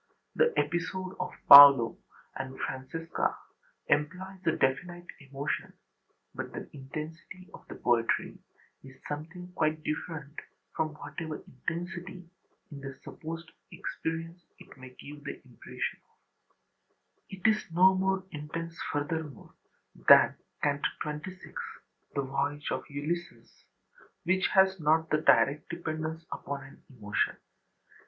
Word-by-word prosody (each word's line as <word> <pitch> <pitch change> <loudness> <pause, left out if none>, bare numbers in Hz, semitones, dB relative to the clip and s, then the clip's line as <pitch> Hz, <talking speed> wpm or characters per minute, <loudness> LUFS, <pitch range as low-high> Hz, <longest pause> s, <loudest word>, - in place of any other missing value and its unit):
The 475 0 +4
episode 185 +2 -1
of 180 - -2 0.2
Paolo 140 -4 +11 0.4
and 130 0 -6
Francesca 150 +5 -2 0.5
employs 185 +6 -1
a 165 - +4
definite 175 +7 -1 0.2
emotion, 140 +2 -3 0.6
but - - -5
the - - -6
intensity 155 +6 -8
of - - -13
the - - -8
poetry 115 -2 +1 0.4
is 135 -1 -13
something 165 +5 -6
quite 155 -2 0
different 155 -2 -4 0.4
from 155 -1 -1
whatever 155 +1 -6
intensity 175 +5 -6 0.4
in 140 -1 -8
the 135 -1 -7
supposed 165 +1 -7 0.2
experience 165 +2 -5
it - - -15
may 130 -2 -11
give 145 +3 -12
the 145 - -6
impression 125 -2 -5
of. - - -42 0.7
It 190 -2 -10
is 215 -3 +2
no 185 +3 +6
more 190 0 +1
intense, 165 +3 -6
furthermore, 145 -2 -4 0.4
than - - +7 0.3
Canto 145 -1 +1
XXVI, 150 +5 -7 0.6
the 140 - +1
voyage 145 +2 -2
of - - -2
Ulysses, 155 +5 -5 0.6
which 185 +2 +2
has 190 -1 +5
not 160 +1 +2
the 155 - +2
direct 145 -1 +4
dependence 160 -1 -4
upon 140 0 -5
an 135 - -15
emotion. 105 -6 -1
155 Hz, 120 wpm, -30 LUFS, 140-175 Hz, 0.7 s, Paolo